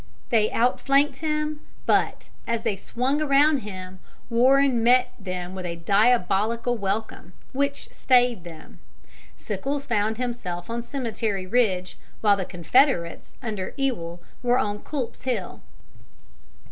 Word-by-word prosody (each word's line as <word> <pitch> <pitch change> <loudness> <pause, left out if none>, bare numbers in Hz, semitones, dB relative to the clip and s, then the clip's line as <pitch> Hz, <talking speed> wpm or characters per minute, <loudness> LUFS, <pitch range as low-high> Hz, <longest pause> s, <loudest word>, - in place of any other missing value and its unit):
They 215 -1 +3
outflanked 275 +4 +2
him, 305 -1 -2 0.3
but, - - +1 0.2
as 230 -1 -1
they 225 -4 0
swung 255 +9 -1
around 290 +1 +4
him, 185 -4 -8 0.3
Warren 260 +1 +4
met 250 +2 +4
them 185 -2 -5
with 190 -1 -6
a 170 - -4
diabolical 215 +5 +2
welcome, 200 -2 -3 0.2
which 280 +1 -1
stayed 245 -6 +3
them. 165 -3 -12 0.6
Sickles 275 +8 -3
found 220 -1 0
himself 230 -7 -4
on 235 +1 -2
Cemetery 225 -6 -3
Ridge, 185 -4 0 0.2
while 205 -2 +5
the 190 -2 -3
Confederates 180 - +1
under 210 -5 -4
Ewell 175 -12 -2 0.2
were 245 0 +3
on 210 -5 -1
Culp's 265 -2 -5
Hill. 240 -8 -3
230 Hz, 120 wpm, -25 LUFS, 190-260 Hz, 0.6 s, while